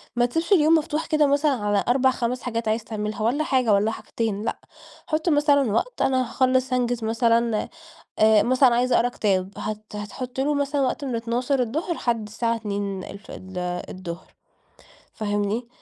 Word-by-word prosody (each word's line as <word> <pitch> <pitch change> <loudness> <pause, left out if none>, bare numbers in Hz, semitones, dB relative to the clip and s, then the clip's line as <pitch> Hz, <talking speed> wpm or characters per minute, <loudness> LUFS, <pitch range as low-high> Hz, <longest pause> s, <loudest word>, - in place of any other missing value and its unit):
ما 240 0 +3
تسيبش 325 - -2
اليوم 320 -3 +5
مفتوح 310 0 -1
كده 305 -2 +3
مثلًا 285 +2 +2
على 205 -5 0
4، 260 +1 +4
5 250 0 -2
حاجات 230 -2 -3
عايز 220 +1 0
تعملها، 215 -1 -4
والّا 275 +7 +1
حاجة 255 -7 +2
والّا 210 +2 +2
حاجتين 215 -1 -3
لأ، - - -3 0.5
حُط 315 +2 0
مثلًا 290 -5 +3
وقت - - -1
أنا 260 -1 +2
هاخلص 255 +1 +1
هانجز 245 -2 0
مثلًا 230 0 +1 0.5
آآ 215 -1 +5
مثلًا 255 0 +4
عايز 250 +1 +1
أقرا 245 - +3
كتاب، 195 -5 0
هت 215 0 -4
هتحُط 245 +5 -6
له 285 +3 +1
مثلًا 285 0 0
وقت 270 +2 -1
من 255 - -2
12:00 250 +7 -1
لحد 230 -7 -2
الساعة 230 +2 -1
14:00 190 -3 -6 0.8
فاهمني؟ 205 +2 -2
235 Hz, 150 wpm, -24 LUFS, 215-265 Hz, 0.8 s, اليوم